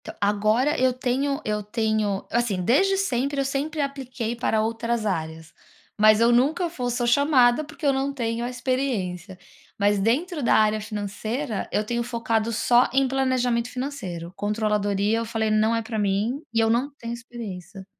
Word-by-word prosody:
Entao, - - -8
agora 215 +7 +2
eu 260 0 +4
tenho 265 +3 -1
eu 210 0 -1
tenho, 215 0 0 0.2
eu - - +1
assim, 220 -6 -1
desde 385 - +3
sempre 280 -6 -1
eu 275 - +1
sempre 290 +3 -2
apliquei 260 -4 -4
para 225 -2 0
outras 230 0 -1
áreas, 160 -4 -4 0.4
mas 215 0 +5
eu 230 +1 +4
nunca 295 +9 +2
fo 250 -7 -3
sou 245 0 -1
chamada, 255 +1 +4
porque 300 +1 -9
eu 280 - +4
não 270 +1 -1
tenho 235 -3 -2
a 240 - -2
experiência. 240 -8 -2 0.4
Mas 205 0 +2
dentro 295 - 0
da - - +4
área 215 0 +3
financeira, 215 +3 -4
eu 210 - +1
tenho 235 +2 -2
focado 230 -1 -1
só 240 +2 +3
em 270 0 +3
planejamento 250 -3 0
financeiro, 195 -12 -5
controladoria 210 0 0
eu 230 - -3
falei 220 -1 -1
não 215 +2 +3
é 230 - -1
pra 220 0 -4
mim 210 +7 0
e 230 - +2
eu 225 0 +3
não 240 +5 +1
tenho 235 0 -5
experiência. 215 -5 -8
235 Hz, 175 wpm, -24 LUFS, 215-260 Hz, 0.4 s, mas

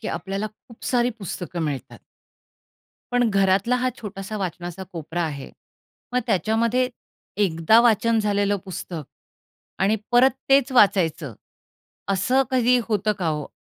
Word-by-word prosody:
की 220 - -4
आपल्याला 195 +2 -3
खूप 215 +2 -15
सारी 245 -1 +2
पुस्तकं 180 -3 -5
मिळतात. 145 -4 -4 1.1
पण 245 -1 +3
घरातला 195 +4 +2
हा 250 +1 0
छोटासा 205 0 -6
वाचनाचा 175 -1 -5
कोपरा 170 +1 -4
आहे. 145 -4 -5 0.6
मग 250 - +2
त्याच्यामध्ये 230 +5 +1 0.6
एकदा 165 +5 +4
वाचन 230 -1 +3
झालेलं 205 -1 +1
पुस्तक 175 -3 -6 0.8
आणि 205 +3 +3 0.2
परत 250 +2 +6 0.2
तेच 275 -1 +4
वाचायचं 170 - +3 0.8
असं 225 +8 +2
कधी 250 -1 +3
होतं 210 -1 +1
का 180 - -2
हो? 150 -2 -2
205 Hz, 125 wpm, -23 LUFS, 175-235 Hz, 1.1 s, परत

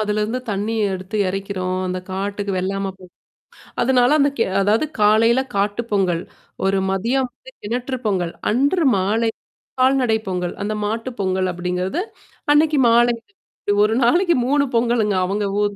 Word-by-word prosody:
அதுலருந்து 215 +3 -1
தண்ணீ 205 +3 -2 0.2
எடுத்து 185 +3 -5
எறைக்கிறோம். 185 -1 -3
அந்த 185 0 -2
காட்டுக்கு 200 +1 -3
வெள்லாம 195 +1 -2
போ 185 - -14 0.8
அதனால 250 0 +4
அந்த 280 - +4
கே 230 - +2 0.2
அதாவது 215 +9 +2
காலையில 225 +4 +4
காட்டு 205 +3 0
பொங்கல், 180 -4 +1 0.4
ஒரு 195 0 +2
மதியம் 245 +7 0
வந்து - - -16
கிணற்று 250 +4 -3
பொங்கல், 180 -5 0 0.2
அன்று 285 - +2
மாலை 215 +4 +1 0.5
கால்நடை 255 -4 +3
பொங்கல். 180 -1 -2
அந்த 215 - -2
மாட்டு 225 +4 -2
பொங்கல் 185 -1 0
அப்டிங்கிறது, 180 - -2 0.5
அன்னைக்கு 305 -1 +3
மாலைக்கு. 235 +2 +2 0.3
இப்டி 205 - 0
ஒரு 220 - 0
நாளைக்கு 345 +7 +3
3 285 +1 +3
பொங்கலுங்க, 230 -3 +2
அவங்க 205 +2 -1 0.2
ஊர் 205 -1 0
210 Hz, 140 wpm, -20 LUFS, 195-245 Hz, 0.8 s, அதனால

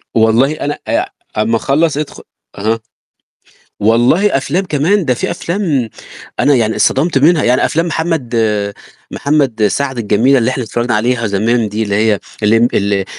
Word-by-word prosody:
والله 115 +5 +3
أنا 145 -1 -4
آآ - - 0 0.3
ع - - +2
أمّا 115 +1 +1
أخلّص 145 +5 +1
ادخُل 150 -1 -5 0.3
أها. 110 +3 -1 1.0
والله 120 - +3
أفلام 155 +8 -1
كمان، 175 +5 +1
ده 125 - +1
في - - -3
أفلام 170 - -2 0.5
أنا 145 - +4
يعني 110 -3 +1
اتصدَمت 140 +1 +2
منها 155 +3 +3
يعني 125 +1 +2
أفلام 165 +2 0
محمد 160 -7 -2 0.8
محمد 135 -7 +1
سعد 135 +2 -2
الجميلة 115 +5 +3
اللي 120 +1 +1
إحنا 130 -1 -3
اتفرّجنا 120 +1 -2
عليها 115 +1 0
زمان 110 +3 0
دي 110 +2 -3
اللي 100 -2 -1
هي 105 -1 +2 0.2
اللمْب 115 +3 +3
ال 100 +1 0
آآ 95 -1 -1
125 Hz, 160 wpm, -14 LUFS, 110-150 Hz, 1.0 s, أنا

